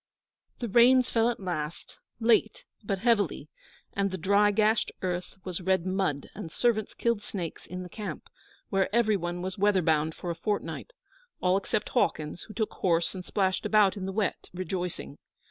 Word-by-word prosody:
The 240 - -3
Rains 245 +4 +5
fell 230 0 +3
at 240 - -3
last, 175 -4 -5 0.2
late, 235 - +3 0.2
but 200 -1 -1
heavily; 200 - +1 0.4
and 200 0 +1
the 190 - -4
dry, 200 +4 +4
gashed 215 +1 +2
earth 180 -1 -2
was 185 -1 -4
red 185 -1 +1
mud, 185 -7 -1
and 160 - -7
servants 225 0 0
killed 235 -3 0
snakes 180 -5 -6
in 180 0 -5
the - - -7
camp, 210 +3 -6 0.4
where 195 -1 +2
every 220 -3 +4
one 175 -1 -3
was 185 +1 -4
weather 200 -2 +3
bound 155 -1 +2
for 175 - -4
a - - -4
fortnight 205 - -3 0.5
all 180 0 +3
except 200 +2 -1
Hawkins, 170 -8 0
who 215 - -11
took 220 -2 -1
horse 170 -2 +1
and 185 -2 -6
splashed 190 0 0
about 210 -3 +4
in 190 -2 -4
the - - -2
wet, 200 -1 -2
rejoicing. 180 -5 -4
190 Hz, 175 wpm, -28 LUFS, 180-215 Hz, 0.5 s, Rains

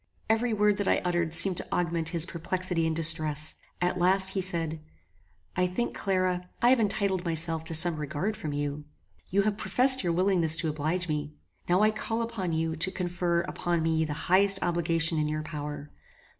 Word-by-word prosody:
Every 230 +2 +1
word 210 -1 +2
that 205 - -2
I - - +3
uttered 175 -2 0
seemed 170 +2 +4
to - - -2
augment 170 -2 -1
his 165 -1 0
perplexity 175 -1 -2
and 160 - -1
distress. 155 -2 +1 0.3
At 180 +1 -1
last 190 +2 +4
he 190 0 -2
said, 165 -4 -3 0.7
"I 180 - +1
think, 235 +7 -3
Clara, 185 -2 -1
I 240 +1 +4
have 260 - +4
entitled 200 -3 0
myself 165 -1 +1
to 165 0 -3
some 165 0 +3
regard 150 +8 -3
from 155 - -5
you. 145 0 -4 0.4
You 200 +2 +2
have 210 -1 -1
professed 260 +2 +4
your 170 -2 0
willingness 175 -3 +3
to 165 -1 -1
oblige 155 +4 -2
me. 150 -1 -4 0.3
Now 180 +4 +3
I 215 - +4
call 225 +1 -3
upon 220 -7 -4
you 160 0 -1
to 165 +4 +3
confer 175 -2 -1
upon 170 -1 -2
me 160 0 +1
the 155 -2 -3
highest 195 +2 +5
obligation 165 -2 +1
in 150 - 0
your 155 0 -3
power. 150 -2 -7
175 Hz, 185 wpm, -27 LUFS, 160-190 Hz, 0.7 s, highest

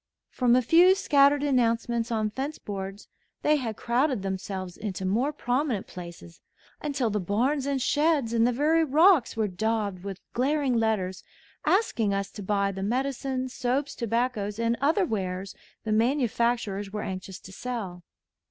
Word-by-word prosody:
From 245 -2 +3
a 255 - +3
few 345 +9 +6
scattered 285 -5 +4
announcements 235 -3 +1
on 215 -2 0
fence 275 +6 -4
boards, 195 0 -6 0.4
they 300 0 +4
had 230 -6 -4
crowded 245 -2 0
themselves 190 -1 -4
into 195 -3 -5
more 235 +10 +1
prominent 255 -5 -1
places 170 -1 -11 0.4
until 275 -6 -1
the 210 - 0
barns 250 - 0
and 280 -1 0
sheds 290 -3 +1
and 230 0 +4
the - - +2
very 310 +6 +2
rocks 315 - +4
were 220 -1 +1
daubed 205 -1 -2
with 195 -2 -6
glaring 275 +1 +1
letters 215 -5 0 0.5
asking 230 - +2
us 195 0 -3
to 210 - -8
buy 200 0 0
the 190 0 -6
medicines, 260 +3 -2
soaps, 270 +3 -1
tobaccos, 230 -3 -1
and 230 0 +1
other 325 +7 +3
wares 190 - -3 0.3
the 220 - -3
manufacturers 235 -4 +1
were 210 0 -4
anxious 185 0 -6
to 190 - -13
sell. 195 -5 -5
235 Hz, 150 wpm, -27 LUFS, 200-275 Hz, 0.5 s, few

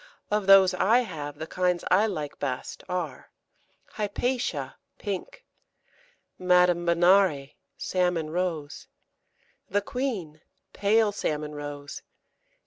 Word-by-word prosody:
Of 210 -2 0
those 195 -1 +7
I 220 +7 +3
have, 145 -10 -6
the 160 - -5
kinds 180 +1 0
I 205 +4 +5
like 155 -8 -5
best 130 -3 -4
are 175 -7 -4 0.6
Hypatia, 245 +4 -2 0.2
pink. 205 - -6 0.9
Madame 180 -1 +3
Benare, 170 -4 +3 0.2
salmon 180 -4 -1
rose. 165 -4 -3 0.8
The 205 +1 0
Queen, 200 - -4 0.3
pale 210 +1 +3
salmon 150 -6 -3
rose. 145 -1 -7
180 Hz, 100 wpm, -27 LUFS, 155-200 Hz, 0.9 s, those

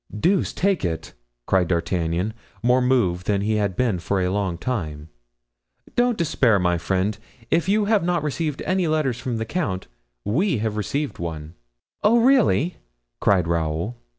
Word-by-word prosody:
"Deuce 185 - +2
take 195 0 0
it!" 80 -3 -3 0.3
cried 95 -2 +2
D'Artagnan, 85 +3 -1 0.3
more 125 +2 +4
moved 100 -9 +1
than 100 -1 +1
he 105 +1 +1
had 100 -3 0
been 115 -6 +1
for 95 +3 -1
a 90 0 0
long 95 -3 -1
time, 80 -9 -4 0.9
"don't 245 -2 +2
despair, 130 -9 +3
my 90 -2 +1
friend, 95 +4 -1 0.3
if 170 +3 +2
you 210 +1 +3
have 210 -3 +2
not 175 -2 0
received 150 0 -2
any 185 -2 +1
letters 150 -6 0
from 120 -1 -3
the 110 - -2
count, 110 - -2 0.4
we 160 - +1
have 110 0 -2
received 140 +8 -2
one." 80 -2 -5 0.5
"Oh, 230 +3 +5
really!" 235 - +3 0.4
cried 90 -4 +3
Raoul. 85 +6 -1
110 Hz, 155 wpm, -23 LUFS, -, 0.9 s, Oh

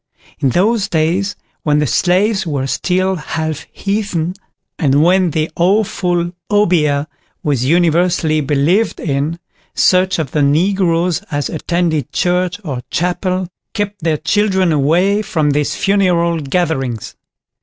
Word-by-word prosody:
In 140 -2 +2
those 195 - +1
days 175 +5 0 0.3
when 150 -1 +1
the 150 - +2
slaves 190 - +1
were 140 -4 -1
still 185 +6 0
half 155 0 -4
heathen, 195 -5 -2 0.5
and 145 -3 +3
when 180 +1 +3
the 155 +1 -1
awful 175 -2 +1 0.2
Obeah 165 -9 +2 0.4
was 135 -4 0
universally 170 0 +2
believed 150 +10 +1
in, 150 +2 -2 0.4
such 185 0 +3
of 155 -6 -3
the 150 - 0
Negroes 175 +3 +1
as 145 -3 -2
attended 165 -3 -1
church 180 +1 0
or 135 -8 -4
chapel 180 +1 -1 0.3
kept 205 -2 -3
their 160 -2 +1
children 190 -1 +1
away 170 +8 +2
from 155 -7 0
these 145 0 0
funeral 180 -4 +1
gatherings. 135 - -2
170 Hz, 125 wpm, -16 LUFS, 150-190 Hz, 0.5 s, and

